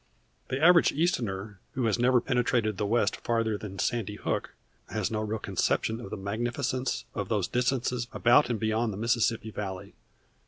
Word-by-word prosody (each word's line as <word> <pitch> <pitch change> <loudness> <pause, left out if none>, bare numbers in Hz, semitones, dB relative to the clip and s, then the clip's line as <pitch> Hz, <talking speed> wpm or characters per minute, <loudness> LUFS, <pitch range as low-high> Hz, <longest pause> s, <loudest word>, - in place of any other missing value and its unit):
The 130 - -2
average 170 +2 +6
Easterner 110 - -1
who 130 -2 -1
has 110 0 +1
never 125 +1 +4
penetrated 115 -4 0
the 105 - 0
West 110 -1 +1
farther 115 -2 0
than 100 -2 -7
Sandy 105 -1 -1
Hook - - -3 0.3
has - - -2
no 110 -1 -1
real 110 +1 -2
conception 110 +2 0
of - - -8
the - - -5
magnificence 120 +5 -2
of 100 -3 -4
those 105 -5 +1
distances 125 -1 0
about 120 +4 +4
and 115 -3 -1
beyond 110 +1 0
the - - -6
Mississippi 115 0 +1
Valley. 95 -3 -6
115 Hz, 165 wpm, -28 LUFS, 105-120 Hz, 0.3 s, average